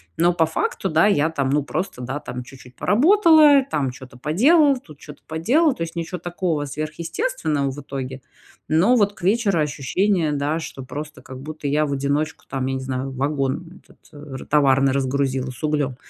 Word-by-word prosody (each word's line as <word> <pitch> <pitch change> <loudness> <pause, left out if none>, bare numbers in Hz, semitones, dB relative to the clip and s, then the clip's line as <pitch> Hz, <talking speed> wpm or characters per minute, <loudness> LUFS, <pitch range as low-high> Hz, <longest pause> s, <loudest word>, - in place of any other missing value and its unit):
но 175 +1 +3
по 165 -2 +3
факту, 160 - -2
да, 160 +6 +4
я 160 -5 +2
там, 135 -4 -1
ну, 145 +1 +2
просто, 160 -4 -4
да, 130 +4 -4
там, 125 0 -6
чуть-чуть 125 0 -14
поработала, 310 - +5
там 135 -4 -1
чё-то 125 0 -13
поделала, 275 - +4
тут 155 - -14
чё-то 150 -1 -12
поделала. 255 - +2
То 165 - -3
есть 165 +1 -7
ничё 170 +2 -4
такого 175 -3 -2
сверхъестественного 155 - -2
в 140 +2 -7
итоге. 135 -2 -6 0.5
Но 180 +11 +4
вот 205 -3 +2
к - - -17
вечеру 200 -3 +2
ощущение, 155 +4 0
да, 145 +3 -1
что 135 -4 -7
просто, 150 +4 -8
как 130 -1 -10
будто, 155 0 -6
я 150 +2 +2
в 140 - -4
одиночку, 145 +3 -2
там, 135 -1 -2
я 135 - -1
не 130 - -3
знаю, 130 0 -4
вагон 140 +6 -3
этот - - -22 0.2
р 145 -3 -9
товарный 135 -2 +3
разгрузила 135 -1 -1
с 125 - -13
углём. 145 -4 0
150 Hz, 185 wpm, -22 LUFS, 135-175 Hz, 0.5 s, поработала